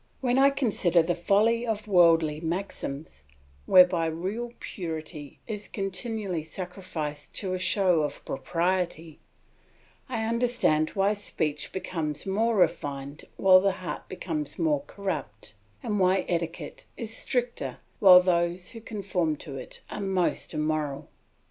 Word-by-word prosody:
When 250 0 +2
I 275 +1 +7
consider 205 - +2
the 175 +2 0
folly 210 +7 +2
of 220 -2 -3
worldly 165 -5 +4
maxims, 160 - -4 0.4
whereby 180 -2 +6
real 195 +9 -3
purity 160 -4 -6
is 210 -2 -5
continually 195 -2 -3
sacrificed 165 -4 -6
to 190 -3 -2
a 185 - -2
show 180 -3 +3
of 150 - -4
propriety, 170 0 -2 0.9
I 225 -3 -1
understand 230 -10 +2
why 200 +1 +3
speech 155 -7 -3
becomes 160 -5 -3
more 220 +4 +1
refined 145 -6 -1
while 185 -1 +7
the 195 0 +2
heart - - -6
becomes 305 -2 -4
more 300 -3 +1
corrupt, 135 - -5 0.3
and 210 -2 -1
why 185 0 +3
etiquette 170 -1 -3
is 225 -1 -3
stricter 240 - -2 0.2
while 180 -2 +9
those 175 0 0
who 230 - -9
conform 190 -7 -1
to 140 -1 -8
it - - -9
are 205 - -4
most 190 -4 -1
immoral. 150 -2 -2
180 Hz, 130 wpm, -27 LUFS, 160-205 Hz, 0.9 s, while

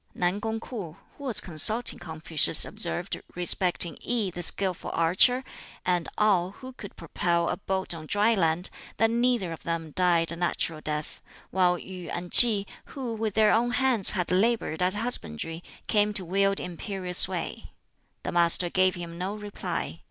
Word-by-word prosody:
Nan 180 +3 -1
kung 225 +1 -3
Kwoh, 195 -9 -8 0.2
who 285 - -11
was 250 -5 +5
consulting 215 +8 +3
Confucius, 160 -1 +2
observed 180 -3 -1
respecting 175 0 +4
I, 225 -6 -1
the 175 - -6
skilful 185 0 +1
archer, 190 +10 +3 0.4
and 180 -2 -1
Ngau, 195 -3 +1
who 260 0 -11
could 205 -5 -11
propel 170 +1 -1
a - - -3
boat 190 -2 -3
on 160 -2 -10
dry 210 +5 +2
land, 175 -2 0 0.3
that 225 0 +2
neither 235 -6 0
of 165 - -8
them 165 -2 -5
died 170 -1 +2
a - - -5
natural 165 -2 -3
death; 150 0 -5 0.3
while 180 -1 +2
Yu 180 -1 -10
and 175 0 -6
Tsih, 215 -5 +8 0.2
who 255 -4 -6
with 220 -2 -4
their 215 -1 +4
own 235 +2 +1
hands 245 -5 +3
had 180 -1 -2
labored 195 -3 0
at 185 +2 0
husbandry, 165 - -2 0.2
came 210 0 +1
to 190 -4 0
wield 195 +2 0
imperial 180 +1 -6
sway. - - +1 0.6
The - - -4
Master 175 0 +2
gave 185 0 +2
him 170 -1 -8
no 190 +3 -4
reply. 210 -1 -6
185 Hz, 165 wpm, -26 LUFS, 170-215 Hz, 0.6 s, Tsih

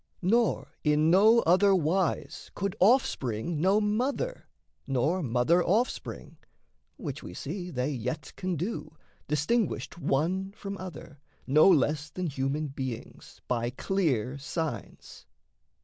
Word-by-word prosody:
Nor 230 +5 +2
in 150 +1 +3
no 220 +6 +6
other 195 +2 +4
wise 175 +1 -1
could 195 -1 -2
offspring 165 - +2
know 195 +4 +4
Mother, 255 - -1 0.4
nor 140 +8 +1
mother 130 +6 +2
offspring 225 +7 -1 0.6
which - - -5
we - - -9
see 180 -2 -5
They 130 -2 -1
yet 125 +3 -4
can 185 -1 -2
do, 175 0 -4 0.3
distinguished 170 +6 0
one 185 +7 0
from 200 -1 -6
other, 165 -5 -9 0.3
No 155 +7 +6
less 150 -2 +2
than 185 +3 -4
human 145 0 -2
beings, 130 -4 -7
by 120 -1 0
clear 135 - -1
signs. 145 - -5
165 Hz, 115 wpm, -28 LUFS, 140-195 Hz, 0.6 s, no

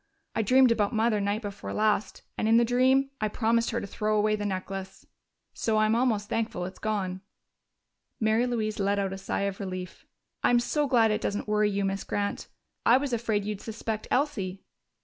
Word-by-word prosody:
I - - +1
dreamed 255 +3 +5
about 215 -1 +1
Mother 220 -1 +2
night 205 +3 -1
before 200 -1 -6
last, 215 -1 0
and 215 - -1
in 225 +1 +5
the 235 - +5
dream 260 +3 +3
I 215 - +2
promised 230 +2 +1
her 235 - -1
to - - -5
throw 215 +2 -1
away 215 0 +2
the 205 -1 -3
necklace.... 190 0 -5 0.5
So 220 -1 0
I'm 215 0 +3
almost 225 -4 +1
thankful 220 -6 -2
it's 185 - -8
gone." 190 -4 -2 1.0
Mary 220 +2 +2
Louise 215 -3 -2
let 200 +1 +1
out 195 -1 -1
a - - -5
sigh 195 - -2
of 200 -1 -2
relief. 185 -2 -6 0.4
"I'm 245 - +5
so 290 +4 0
glad 230 -4 +4
it 210 +1 0
doesn't 205 +1 -2
worry 210 0 +2
you, 200 -1 -1
Miss 195 0 -2
Grant. 205 0 -3 0.4
I 240 - +6
was 270 -1 -2
afraid 220 -3 0
you'd 210 -1 -4
suspect 220 -1 -4
Elsie." 205 -10 -1
215 Hz, 190 wpm, -28 LUFS, 200-230 Hz, 1.0 s, I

